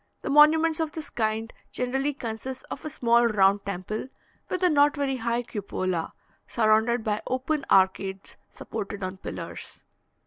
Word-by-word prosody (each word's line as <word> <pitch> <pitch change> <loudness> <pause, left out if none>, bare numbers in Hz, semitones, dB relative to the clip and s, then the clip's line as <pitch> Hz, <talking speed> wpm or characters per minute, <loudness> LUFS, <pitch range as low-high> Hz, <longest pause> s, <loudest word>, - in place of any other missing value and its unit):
The - - -2
monuments 315 +2 +5
of 320 -2 -1
this 315 -2 -7
kind 220 0 -1 0.2
generally 270 +3 -1
consist 250 +1 -6
of - - -6
a 310 - -4
small 235 -3 +3
round 200 -2 +3
temple, 200 +4 -4 0.4
with 370 0 -2
a 360 - +6
not 290 -1 +4
very 275 -2 -1
high 235 0 -1
cupola, 185 -6 -3 0.3
surrounded 220 +1 +2
by 210 -1 -1
open 275 +3 -1
arcades 190 0 +2
supported 205 -2 -6
on 185 +1 -4
pillars. - - -8
235 Hz, 145 wpm, -26 LUFS, 205-280 Hz, 0.4 s, a